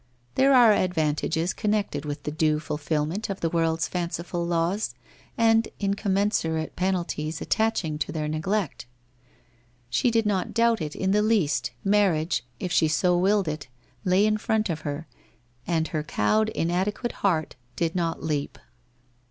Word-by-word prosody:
There 270 - +4
are 235 -4 +7
advantages 160 -1 0
connected 205 -9 -1
with 145 -1 -5
the 150 - -3
due 155 0 +1
fulfilment 155 +6 -2
of 195 - -3
the 165 - 0
world's 165 -2 +1
fanciful 175 0 -3
laws, 170 +5 0 0.4
and 225 0 +4
incommensurate 195 -5 0
penalties 170 -4 -1
attaching 190 -9 0
to - - -2
their 155 -2 -2
neglect. 155 0 -2 1.0
She 245 - +2
did 225 -1 +2
not 195 -3 -1
doubt 230 -3 +3
it 150 -1 -4
in 190 0 0
the 210 +1 +3
least, 185 - +1
marriage, 190 -5 +2 0.2
if 180 - -3
she 160 - +4
so 175 +4 +2
willed 195 +1 +2
it, 150 -2 -4 0.4
lay 185 +3 +3
in 215 0 +2
front 215 -3 0
of 160 - -3
her, 145 +1 -4 0.6
and 165 -2 0
her 155 - -1
cowed 155 - +1
inadequate 190 +6 -1
heart 165 -6 +1 0.2
did 165 -1 0
not 170 -2 -1
leap. 150 -3 -2
175 Hz, 145 wpm, -26 LUFS, 155-205 Hz, 1.0 s, are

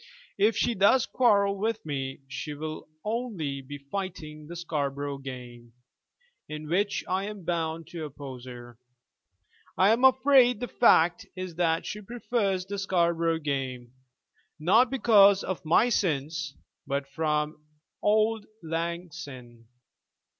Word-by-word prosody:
If 210 +2 +3
she 240 - +2
does 220 +5 +4
quarrel 200 -5 +3
with 220 -1 -2
me, 135 -2 -4
she 145 +3 -5
will 155 +1 -6 0.2
only 210 - -3
be 145 +2 -8
fighting 155 -1 -6
the 175 - -8
Scarborough 145 -4 -3
game, 120 -3 -9 0.8
in 155 0 -6
which 200 +5 0
I 190 +2 0
am 205 -2 -7
bound 165 -1 -2
to 165 -3 -5
oppose 135 -3 -9
her. 120 -2 -10 1.0
I 190 +4 +5
am 235 +3 +2
afraid 260 -2 +5
the 245 - -3
fact 175 -9 +4
is 185 -2 -5
that 165 -1 +1
she 210 - -5
prefers 210 -4 -1
the 200 +1 -4
Scarborough 170 -3 +1
game, 135 -5 -3 0.7
not 220 +10 +4
because 205 -6 +5
of 185 - -4
my 170 +9 +4
sins, 150 - -1 0.3
but 140 0 -2
from 150 +1 -1 0.4
auld 215 +1 +2 0.2
lang 170 +2 -3
syne. 125 -8 -10
170 Hz, 130 wpm, -28 LUFS, 145-200 Hz, 1.0 s, I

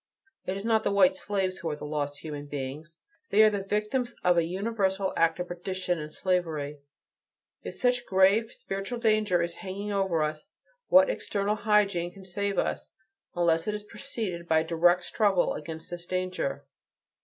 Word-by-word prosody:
It 185 +1 -1
is 195 - -6
not 220 -1 +3
the - - +1
white 190 -2 +5
slaves 190 -1 -2
who 165 - -3
are 150 - -2
the 150 - -8
"lost" 145 -1 -3
human 145 -2 -6
beings; 145 +4 -6 0.3
they 215 - +6
are 215 - +6
the 205 -1 -1
victims 210 +5 -1
of 180 -1 +4
a 170 - +4
universal 195 +1 -1
act 165 0 +2
of 180 - -3
perdition 180 0 -3
and 150 0 -6
slavery. 155 -6 -1 0.8
If - - -7
such 245 -1 +2
a - - -24
grave 195 +4 +4
spiritual 195 +5 -5
danger 215 -6 +2
is 170 0 -4
hanging 200 +1 -5
over 190 -5 +1
us, 150 0 -4 0.4
what 280 0 +6
external 200 0 -1
hygiene 205 -5 +2
can 190 0 -14
save 200 +2 -2
us, - - -1 0.5
unless 165 -1 +2
it 210 - 0
is 210 - -6
preceded 205 -7 -5
by 160 -1 +4
a 160 - -6
direct 175 +2 +3
struggle 200 -4 +2
against 160 +2 -7
this 175 0 -7
danger? 185 -6 -2
185 Hz, 180 wpm, -28 LUFS, 165-205 Hz, 0.8 s, they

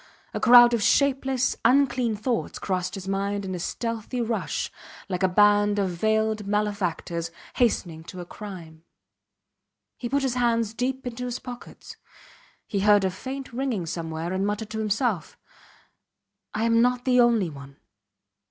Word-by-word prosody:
A - - -2
crowd 240 0 +8
of 235 - +1
shapeless, 265 +2 +2
unclean 255 -4 +3
thoughts 225 +3 -2
crossed 185 -1 -2
his 190 -1 -7
mind 200 +1 -1
in 185 - -4
a 180 - -4
stealthy 230 +6 -3
rush, 230 -1 -2 0.4
like 180 -1 -2
a 190 - +4
band 205 +2 +4
of 195 -2 0
veiled 220 +3 0
malefactors 195 -5 -1 0.3
hastening 175 -9 0
to 185 - -9
a 175 - -6
crime. 170 -5 -10 1.2
He 240 - -4
put 280 +2 +1
his 265 -3 0
hands 230 -3 +1
deep 255 +3 -2
into 245 0 -4
his 245 0 -3
pockets. 245 -1 -10 0.7
He 200 - -2
heard 205 0 +5
a 190 - +1
faint 260 +7 -7
ringing 245 -8 -2
somewhere, 165 +1 -4
and 190 +1 -1
muttered 205 +1 -2
to 220 - -3
himself: 215 - -1 1.2
I 215 - 0
am 230 0 +4
not 250 +1 +1
the 250 -1 +4
only 230 -8 +3
one 140 -1 -12
215 Hz, 150 wpm, -25 LUFS, 190-245 Hz, 1.2 s, crowd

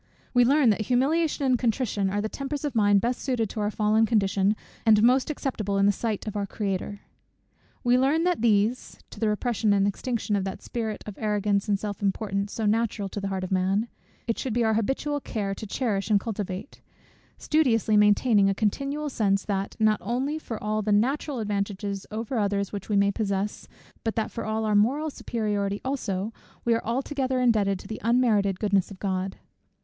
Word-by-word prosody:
We 245 -1 +6
learn 270 -2 +5
that 210 - -1
humiliation 280 +6 +1
and 255 -2 +3
contrition 225 -5 0
are 205 +2 -1
the 215 - -1
tempers 275 +5 -4
of 290 - -2
mind 205 -3 +4
best 240 +3 -1
suited 240 -6 -1
to - - -5
our 210 0 +1
fallen 215 +1 +2
condition, 200 -2 +2 0.3
and 215 -2 +5
most 255 +4 +4
acceptable 220 -9 -2
in 195 - +4
the 205 - +5
sight 215 0 -3
of 215 -1 -5
our 200 -1 -1
Creator. 200 0 -3 0.8
We 245 0 +4
learn 290 +5 +2
that 355 -7 +1
these 225 +2 +1
(to - - -10
the 220 - +1
repression 215 -1 +1
and 200 -1 +3
extinction 220 +1 -2
of 195 - 0
that 190 -1 -5
spirit 220 -3 -4
of 210 -2 -8
arrogance 210 -1 0
and 200 - +3
self 205 0 -5
importance, 200 0 -1
so 220 - -3
natural 210 -2 0
to 205 - -5
the 195 - -2
heart 190 -1 -3
of 185 - -5
man) 190 +4 +1 0.4
it 230 - -2
should 255 - -2
be 240 +1 +2
our 220 -1 +2
habitual 270 +6 0
care 205 -7 -3
to 215 +2 -7
cherish 200 -3 -1
and 210 -2 +4
cultivate; 200 +1 -5 0.6
studiously 235 -9 +2
maintaining 210 0 +4
a 195 - 0
continual 275 +9 -1
sense, 200 -7 0
that, 195 -1 -2
not 215 -1 +3
only 260 +9 -1
for 230 -7 -6
all 215 0 0
the 210 0 -1
natural 265 +7 +1
advantages 200 -2 -3
over 225 +3 -3
others 200 -1 0
which 200 0 -6
we 210 - +1
may 200 0 +4
possess, 200 -1 -2 0.4
but 225 - -1
that 220 - -1
for 230 - -5
all 220 0 -1
our 215 - +1
moral 270 +10 +2
superiority 205 -5 -2
also, 220 -6 -2 0.3
we 235 - +4
are 230 - 0
altogether 260 +2 -1
indebted 215 -6 +2
to - - -12
the 220 - -6
unmerited 220 -5 +2
goodness 200 -3 +1
of 200 - -10
God. 190 -1 -2
215 Hz, 195 wpm, -26 LUFS, 200-245 Hz, 0.8 s, We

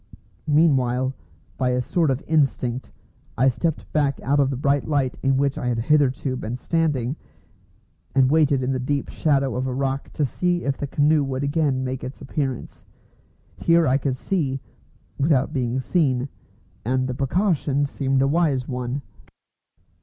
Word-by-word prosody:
Meanwhile, 130 -4 +3 0.5
by 130 -1 +2
a 125 - +1
sort 165 +3 +1
of 135 +1 -1
instinct, 130 -5 0 0.5
I 130 +3 +5
stepped 160 +5 -3
back 140 -3 +1
out 140 +3 +2
of 135 -1 +3
the 135 - -2
bright 140 +2 +1
light 140 -4 0
in 135 0 +2
which 140 0 0
I 125 - -3
had 120 -1 0
hitherto 135 +1 +2
been 120 -1 -4
standing, 150 -4 0 1.0
and 135 -1 +4
waited 145 -4 +3
in 130 - 0
the 130 - -1
deep 140 +2 -2
shadow 140 -3 +1
of 130 +1 -1
a 130 - -2
rock 135 0 -2
to 150 - +1
see 175 +6 -1
if 140 -1 0
the 145 - -4
canoe 150 +2 +3
would 135 0 -3
again 140 -3 +1
make 130 0 -4
its 130 - -7
appearance. 135 -2 -4 0.7
Here 170 0 +3
I 130 +2 +3
could 135 -2 -1
see, 140 -6 -1 0.6
without 140 -2 +2
being 125 -1 -1
seen, 130 -2 +1 0.5
and 130 +2 0
the 130 - -2
precaution 145 0 +1
seemed 135 -1 0
a - - +3
wise 145 -4 +1
one. 125 +1 -3
135 Hz, 160 wpm, -23 LUFS, 130-145 Hz, 1.0 s, I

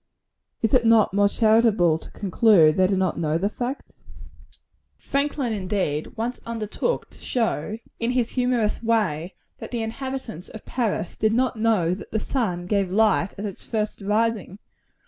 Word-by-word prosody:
Is 225 - +1
it 255 -2 +5
not 225 -4 +4
more 200 0 +4
charitable 215 -8 +3
to - - -10
conclude 190 -6 +4
they 185 0 +4
do 195 0 0
not 185 -1 0
know 155 -1 +1
the 195 +4 0
fact? 245 +5 -5 1.0
Franklin, 280 -4 -1
indeed, 185 -7 -2
once 235 +3 -3
undertook 230 - -3
to - - -13
show, 220 -5 -1 0.2
in 230 - 0
his 245 -2 0
humorous 245 -4 0
way, 200 -7 0 0.2
that - - -7
the 235 -2 -2
inhabitants 235 - -5
of 220 - -11
Paris 225 -8 -2
did 220 0 +1
not 255 +2 +1
know 215 -6 +2
that 185 - -8
the 220 - -1
sun 200 -8 -2
gave 195 0 0
light 205 -1 +2
at 200 - -4
its 200 -3 -7
first 215 -2 -3
rising. 210 -1 0
215 Hz, 160 wpm, -24 LUFS, 190-230 Hz, 1.0 s, it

